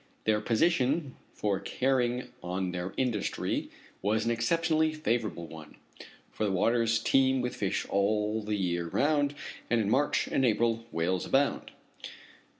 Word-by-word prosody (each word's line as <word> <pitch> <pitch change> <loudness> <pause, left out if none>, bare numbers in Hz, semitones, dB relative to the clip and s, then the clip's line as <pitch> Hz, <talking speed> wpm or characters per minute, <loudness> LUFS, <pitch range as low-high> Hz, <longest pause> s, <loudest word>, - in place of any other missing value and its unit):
Their 105 -1 +2
position 140 +3 +1 0.2
for 100 -3 -1
carrying 125 0 0
on 90 +1 -2
their 90 +1 -4
industry 120 -6 -1 0.3
was 110 +3 +1
an 120 - +1
exceptionally 160 +6 +1
favorable 115 - -2
one, 80 -2 -11 0.6
for - - -4
the 105 - +1
waters 115 +4 +2
teem 130 +3 +3
with 125 0 -2
fish - - -1
all 105 +2 +1
the 105 0 -2
year 85 -3 -1
round, 145 - +1 0.3
and 120 - +3
in 105 -1 0
March 145 - +2
and 135 - 0
April 115 -1 +1
whales 90 +3 -1
abound. 140 +1 +1
115 Hz, 140 wpm, -29 LUFS, 100-130 Hz, 0.6 s, teem